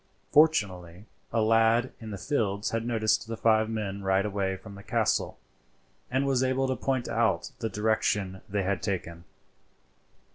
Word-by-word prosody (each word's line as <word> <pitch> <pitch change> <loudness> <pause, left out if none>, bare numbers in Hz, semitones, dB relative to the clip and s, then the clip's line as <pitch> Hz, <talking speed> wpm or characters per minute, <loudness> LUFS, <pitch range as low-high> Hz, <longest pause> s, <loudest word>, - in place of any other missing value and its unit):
Fortunately 100 - +2 0.3
a 115 -1 +2
lad 115 +3 +3
in 110 - -8
the 100 - -5
fields 105 -5 -1
had 115 0 -1
noticed 110 -1 +1
the 115 0 -5
five 110 -1 +3
men 100 -3 -3
ride 95 0 +2
away 100 -2 -1
from 100 +2 -12
the 100 - -10
castle, - - 0 0.7
and 130 +2 +1
was 135 -2 +2
able 130 +1 +1
to 130 - 0
point 130 -2 -1
out 115 -2 0
the 115 -1 -2
direction 105 -2 0
they 100 0 0
had 95 -2 -1
taken. 85 -4 -4
110 Hz, 155 wpm, -28 LUFS, 100-115 Hz, 0.7 s, lad